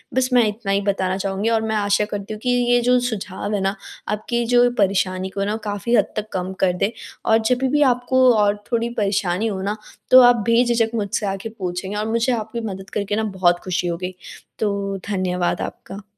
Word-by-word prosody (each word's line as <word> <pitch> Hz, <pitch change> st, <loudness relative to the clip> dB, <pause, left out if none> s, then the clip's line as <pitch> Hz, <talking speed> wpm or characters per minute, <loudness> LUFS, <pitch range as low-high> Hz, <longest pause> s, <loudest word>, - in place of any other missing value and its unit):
बस 260 Hz, -1 st, +2 dB
मैं 240 Hz, -3 st, +5 dB
इतना 205 Hz, -1 st, -4 dB
ही 200 Hz, +1 st, +2 dB
बताना 190 Hz, -2 st, -1 dB
चाहूँगी, 195 Hz, +3 st, -1 dB
और 225 Hz, -1 st, +2 dB
मैं 220 Hz, 0 st, -2 dB
आशा 205 Hz, 0 st, +2 dB
करती 205 Hz, 0 st, -5 dB
हूँ 215 Hz, -, -7 dB
कि 250 Hz, -, 0 dB, 0.2 s
ये 245 Hz, -, +5 dB
जो 250 Hz, +1 st, +3 dB
सुझाव 210 Hz, -4 st, -4 dB
हैं 200 Hz, -, -1 dB
ना, 195 Hz, +1 st, 0 dB, 0.3 s
आपकी 235 Hz, +3 st, -1 dB
जो 245 Hz, +1 st, +4 dB
परेशानी 190 Hz, -1 st, +1 dB
को 195 Hz, +1 st, -3 dB
ना 210 Hz, -, -1 dB
काफ़ी 210 Hz, +4 st, -1 dB
हद -, -, +2 dB
तक 215 Hz, 0 st, -3 dB
कम 185 Hz, 0 st, -3 dB
कर 180 Hz, -2 st, +3 dB
दें। 195 Hz, +4 st, 0 dB, 0.3 s
और 220 Hz, -, +5 dB
जभी 255 Hz, +1 st, +1 dB
भी 295 Hz, +2 st, +2 dB
आपको 255 Hz, +1 st, +3 dB
और 205 Hz, 0 st, +1 dB
थोड़ी 235 Hz, 0 st, 0 dB
परेशानी 200 Hz, 0 st, 0 dB
हो 190 Hz, -3 st, -3 dB
ना, 205 Hz, +2 st, -2 dB, 0.3 s
तो 255 Hz, 0 st, +10 dB
आप 245 Hz, -3 st, +5 dB
बेझिझक 230 Hz, -1 st, +3 dB
मुझसे 205 Hz, -1 st, -1 dB
आके 195 Hz, +3 st, -4 dB
पूछेंगे, 185 Hz, +2 st, -4 dB
और 215 Hz, +1 st, -2 dB
मुझे 230 Hz, +3 st, +1 dB
आपकी 225 Hz, +1 st, -4 dB
मदद 190 Hz, 0 st, -9 dB
करके 205 Hz, -1 st, -1 dB
ना 220 Hz, -, 0 dB, 0.2 s
बहुत 175 Hz, -1 st, +4 dB
खुशी 180 Hz, -1 st, -1 dB
होगी। 180 Hz, +2 st, -4 dB, 0.4 s
तो, 200 Hz, -2 st, -1 dB
धन्यवाद 180 Hz, -3 st, -1 dB
आपका। 200 Hz, +1 st, -7 dB
205 Hz, 205 wpm, -21 LUFS, 195-230 Hz, 0.4 s, तो